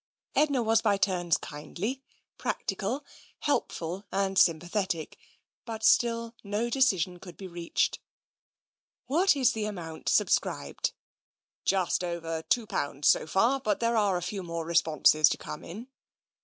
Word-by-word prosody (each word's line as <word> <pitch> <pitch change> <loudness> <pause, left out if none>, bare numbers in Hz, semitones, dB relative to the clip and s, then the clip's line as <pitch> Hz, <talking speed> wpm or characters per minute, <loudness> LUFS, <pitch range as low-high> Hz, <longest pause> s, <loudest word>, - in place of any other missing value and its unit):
Edna 280 -5 +2
was 225 0 +3
by 205 -3 +2
turns 175 -4 +1
kindly, 195 - -5 0.4
practical, 235 +6 -2 0.4
helpful 185 - -1
and 195 0 0
sympathetic, 175 0 +1 0.5
but 220 -2 -6
still 230 +1 +3
no 210 +4 -2
decision 190 -10 +2
could 175 -2 -12
be 195 - -8
reached. 170 -2 -1 0.5
" - - -71
What 355 +3 +4
is 260 -2 +3
the 220 -3 -2
amount 170 -6 -5
subscribed? - - +1 0.2
" - - -72
" - - -70
Just 185 -2 +1
over 165 -2 -3
two 235 +7 +1
pounds, 145 -6 0
so - - +3
far, 230 +11 +2
but 215 -6 0
there 230 0 +1
are 205 -4 +2
a 175 - -4
few 195 +2 -4
more 170 -2 -4
responses 155 -2 +4
to - - -1
come - - -8
in." 215 +8 -8
195 Hz, 145 wpm, -28 LUFS, 170-230 Hz, 0.5 s, What